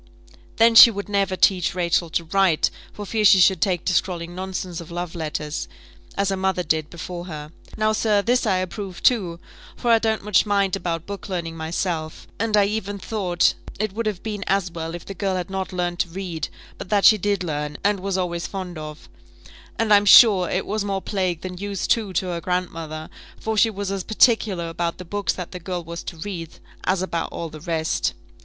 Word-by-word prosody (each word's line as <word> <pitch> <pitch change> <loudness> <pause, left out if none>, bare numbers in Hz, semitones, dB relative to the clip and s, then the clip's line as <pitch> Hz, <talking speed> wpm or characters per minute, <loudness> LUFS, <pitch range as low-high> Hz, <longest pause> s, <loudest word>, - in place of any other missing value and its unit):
Then 230 +1 +5
she 230 - +11
would 200 -2 -5
never 200 -2 0
teach 185 -2 +2
Rachel 170 -1 +1
to 170 - -1
write, 180 -1 +2 0.2
for 205 - -8
fear 215 +2 -1
she 200 -2 +7
should 190 +1 +4
take 180 -4 0
to 185 - +1
scrawling 175 -1 -1
nonsense 185 -1 -5
of 165 - -11
love 175 0 -5
letters, 150 -2 -4 0.5
as 200 0 +1
her 195 - 0
mother 190 -1 0
did 155 -1 0
before 175 +1 -7
her. 150 -3 -7 0.3
Now, 215 0 +2
sir, 210 -2 +2
this 245 +2 +2
I 195 - +3
approved 185 0 -5
too, 185 -9 +2 0.4
for 240 - 0
I 230 - +6
don't 220 -2 0
much 205 -2 +3
mind 200 -2 +1
about 170 -4 -3
book 200 0 -7
learning 170 -3 -3
myself; 160 0 -3
and 215 -1 +1
I 205 - +5
even 205 -1 -3
thought 185 -4 +1 0.3
it 215 -2 -1
would 225 +1 -2
have 205 -4 -3
been 210 -2 -4
as 195 -2 +1
well 165 0 -5
if 175 - -9
the 195 - -6
girl 195 0 -1
had 180 +1 -4
not 190 0 -3
learnt 175 -1 -2
to 175 - 0
read; 170 -3 -4 0.3
but - - -7
that 205 -2 +3
she 215 - +7
did 200 -1 0
learn, 150 -2 -3
and 205 0 +2
was 195 0 -2
always 170 -2 -2
fond 185 -4 -6
of, 150 0 -9 0.7
and 225 -2 +3
I'm 205 0 +5
sure 195 -4 +8
it 185 - -1
was 210 0 -2
more 195 -1 -2
plague 185 -5 -1
than 180 -1 -6
use 200 -2 -3
too 215 -4 +1
to 185 - 0
her 170 -1 -3
grandmother, 165 -3 -3 0.3
for 220 0 -2
she 225 +2 +4
was 200 -2 -4
as 195 -2 -3
particular 215 -6 +2
about 170 0 -3
the 180 - -9
books 205 +3 -1
that 180 -2 -7
the 180 - -6
girl 180 0 -4
was 170 +1 -7
to 170 - -7
read 165 -2 -6 0.3
as 185 0 +1
about 170 -3 -3
all 165 - -5
the 155 -1 -11
rest. 160 -1 -1
185 Hz, 210 wpm, -23 LUFS, 170-205 Hz, 0.7 s, she